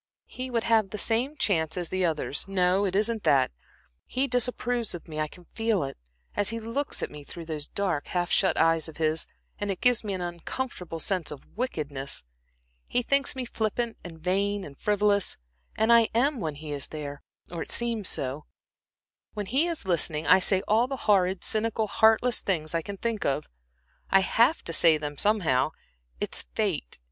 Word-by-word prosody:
"He 255 0 -6
would 230 -2 0
have 220 -4 +3
the 210 - -5
same 240 +8 +2
chance 160 - +1
as 175 -2 -2
the 185 0 0
others. 155 -3 0
No, 190 +1 +2
it 190 -1 -1
isn't 220 +2 +1
that. 135 -7 +3 0.6
He 260 +2 0
disapproves 245 -3 0
of 170 - -10
me; 155 -1 -6
I 155 - 0
can 175 +3 -15
feel 225 -5 +1
it, 135 - -5 0.4
as 205 - +2
he 230 0 -1
looks 230 +6 -2
at - - -3
me 150 -1 -9
through 170 +3 -9
those 155 -2 -5
dark, 185 -7 -1
half 175 -1 -1
shut - - +3
eyes 165 -1 +3
of 160 - -12
his, 155 0 0 0.3
and 205 - -2
it 195 - -2
gives 245 -2 +3
me 205 -2 -3
an - - -4
uncomfortable 175 0 -5
sense 180 0 0
of 145 - -8
wickedness. 145 - -3 0.6
He 245 - 0
thinks 275 +1 +2
me 260 -1 -3
flippant, 230 0 -2
and 170 -2 -9
vain, 195 +4 0
and 140 -5 -9
frivolous, 205 +2 +1 0.4
and 220 +2 +4
I 230 -1 +6
am 270 +3 +2
when 155 -6 -3
he 150 +1 -8
is 140 -2 -2
there, 145 -2 -6 0.3
or 170 -2 -4
I - - -3
seem 235 -3 0
so. 140 -4 -1 0.9
When 210 -1 -3
he 270 - +1
is 335 - -4
listening, 165 -3 0
I - - +7
say 190 +1 +2
all 225 +4 +3
the 270 0 -4
horrid, 190 -3 +3
cynical, 220 0 0
heartless 225 +3 +3
things 155 -5 -1
I 165 - +1
can 200 +4 -7
think 230 0 -2
of. 140 +2 -1 0.6
I 195 - +5
have 235 +10 +3
to 165 - -2
say 165 -1 +6
them, 150 -1 -5
somehow. 170 -9 +2 0.5
It - - -3
is - - +4
fate. - - -1
195 Hz, 190 wpm, -27 LUFS, 160-230 Hz, 0.9 s, I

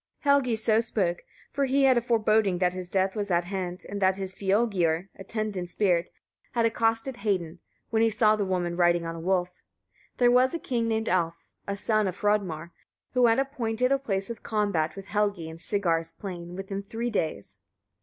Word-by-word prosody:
Helgi 280 -4 +3
so 220 0 +2
spoke, 195 -6 -1 0.3
for 280 0 0
he 270 +1 +2
had 265 -1 +6
a 240 - +3
foreboding 220 -4 +2
that 180 0 +1
his 180 -1 -5
death 190 0 +1
was 205 -1 -2
at 175 -1 +2
hand, 180 0 -5
and 200 0 -5
that 190 0 +3
his 190 -1 -4
fylgiur 190 -4 +1
(attendant 195 -2 -4
spirit) 180 -2 +1 0.4
had 235 -1 +2
accosted 225 +2 0
Hedin, 185 -6 -2 0.3
when 225 -1 +2
he 225 - +4
saw 215 0 +3
the 210 - -1
woman 180 -2 -1
riding 175 -1 +3
on 165 - -3
a 165 - -7
wolf. 180 +1 -1 0.6
There 245 -1 +5
was 255 +4 +4
a - - 0
king 235 -7 -1
named 220 0 0
Alf, 170 -2 -1 0.2
a 200 0 -2
son 215 0 +1
of 185 0 -4
Hrodmar, 185 -6 0 0.4
who 250 -1 +5
had 225 - +4
appointed 250 -3 0
a 275 - +3
place 195 -5 -2
of 230 - -8
combat 200 -8 0
with 195 -1 -8
Helgi 200 -3 -1
in 160 0 -8
Sigar's 165 -4 0
plain 175 -3 -7
within 195 +1 -4
three 225 +4 -4
days. 155 - -3
200 Hz, 190 wpm, -27 LUFS, 180-225 Hz, 0.6 s, had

